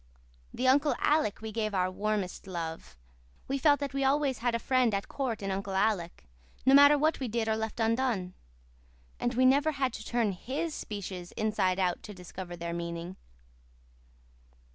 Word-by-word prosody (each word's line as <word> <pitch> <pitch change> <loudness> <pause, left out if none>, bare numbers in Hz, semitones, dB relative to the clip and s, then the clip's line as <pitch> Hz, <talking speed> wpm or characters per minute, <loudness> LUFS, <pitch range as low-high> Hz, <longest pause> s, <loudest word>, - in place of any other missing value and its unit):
To 255 - -1
Uncle 285 +3 +4
Alec 295 -10 +1
we 220 0 -5
gave 215 -2 -2
our 185 0 +1
warmest 205 -2 -2
love. 165 - -6 0.5
We 275 +1 -1
felt 285 +1 +4
that 280 -1 -3
we 275 0 0
always 275 -1 +2
had 240 0 0
a - - +2
friend 250 -2 +2
at 200 - -3
court 245 -7 -3
in 195 - -2
Uncle 195 0 -3
Alec, 190 - 0 0.4
no 265 - +6
matter 285 +1 +8
what 310 +2 +1
we 260 - -2
did 230 0 -1
or 220 - +2
left 220 +1 -4
undone. 225 -5 0 0.9
And 240 0 -1
we 255 +1 +4
never 285 +4 +4
had 265 -4 -1
to 220 - -7
turn 230 -2 0
HIS 280 - -4
speeches 190 -7 -6
inside 210 -4 0
out 180 -2 0
to 210 - -9
discover 180 0 -8
their 170 0 -5
meaning. 170 +1 -5
220 Hz, 175 wpm, -30 LUFS, 185-265 Hz, 0.9 s, matter